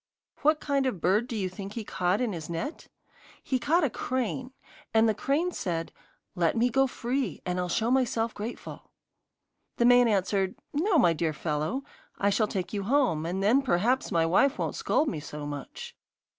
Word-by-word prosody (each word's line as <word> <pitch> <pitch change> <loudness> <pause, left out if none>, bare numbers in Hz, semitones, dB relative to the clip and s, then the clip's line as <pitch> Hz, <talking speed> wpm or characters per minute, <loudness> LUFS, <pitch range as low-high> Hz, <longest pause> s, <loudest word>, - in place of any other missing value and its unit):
What 305 +1 +3
kind 280 -3 0
of 235 -9 -2
bird 200 +8 +2
do 240 - -5
you 195 -3 -1
think 195 +2 -7
he 230 - -4
caught 185 +1 0
in 235 -5 0
his 165 -2 -6
net? 230 - -5 0.6
He 260 - 0
caught 320 +7 +2
a 290 - +2
crane, 255 +1 -3 0.4
and 220 +1 +5
the 220 - +3
crane 295 - 0
said, 165 - -3 0.4
'Let 175 +2 +1
me 245 +2 +2
go 270 +3 +3
free, 245 - -2
and 180 0 -1
I'll 180 0 -2
show 225 +7 +1
myself 235 -3 +1
grateful.' 220 +4 -7 0.9
The 235 - +3
man 245 0 +6
answered, 195 -2 +1 0.2
'No, 340 +5 +2
my 175 - +5
dear 160 0 -1
fellow. 155 - -2 0.3
I 200 0 +2
shall 215 +1 +2
take 190 -1 -4
you 205 - -1
home, 195 - +1
and 190 +3 -2
then 235 +7 +4
perhaps 245 +2 +1
my 165 -1 +3
wife 260 - +3
won't - - -2
scold 305 - +1
me 160 - -2
so 150 0 -7
much. 145 -1 -7
220 Hz, 185 wpm, -28 LUFS, 180-260 Hz, 0.9 s, man